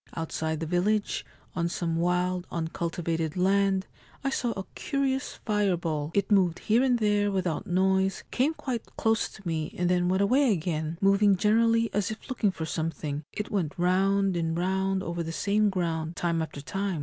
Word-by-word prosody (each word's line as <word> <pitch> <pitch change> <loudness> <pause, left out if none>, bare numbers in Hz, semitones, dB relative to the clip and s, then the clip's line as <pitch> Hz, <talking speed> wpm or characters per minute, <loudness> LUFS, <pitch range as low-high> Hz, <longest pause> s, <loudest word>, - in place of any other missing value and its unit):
Outside 160 -1 -2
the - - -1
village, 195 +6 0 0.3
on 170 -1 0
some 170 -1 -2
wild 180 +1 0
uncultivated 165 -1 -2
land, 195 +1 +2 0.4
I 275 - 0
saw 245 -2 0
a 195 - -3
curious 270 -2 -1
fireball. 175 -8 0
It 200 +1 +1
moved 185 -4 +4
here 225 +3 +2
and 255 -2 +3
there 205 -2 +2
without 185 -5 -1
noise, 190 +1 +1
came 285 +6 +1
quite 245 -7 -3
close 225 0 +1
to 195 -4 -11
me 155 -2 -2
and 175 0 +1
then 180 0 +2
went 190 +2 +2
away 255 +4 +4
again, 160 -3 -2
moving 200 0 +5
generally 230 +3 +3
as 205 -1 0
if 215 +5 -8
looking 225 -5 +1
for 165 -4 -4
something; 155 -2 -3
it 210 - -5
went 175 -7 -1
round 190 +2 +2
and 165 -1 -1
round 190 +1 0
over 170 0 -3
the 165 0 -4
same 205 +4 +2
ground 165 -3 -2
time 170 -1 0
after 155 -3 -5
time. 195 +2 -2
185 Hz, 175 wpm, -28 LUFS, 165-205 Hz, 0.4 s, moving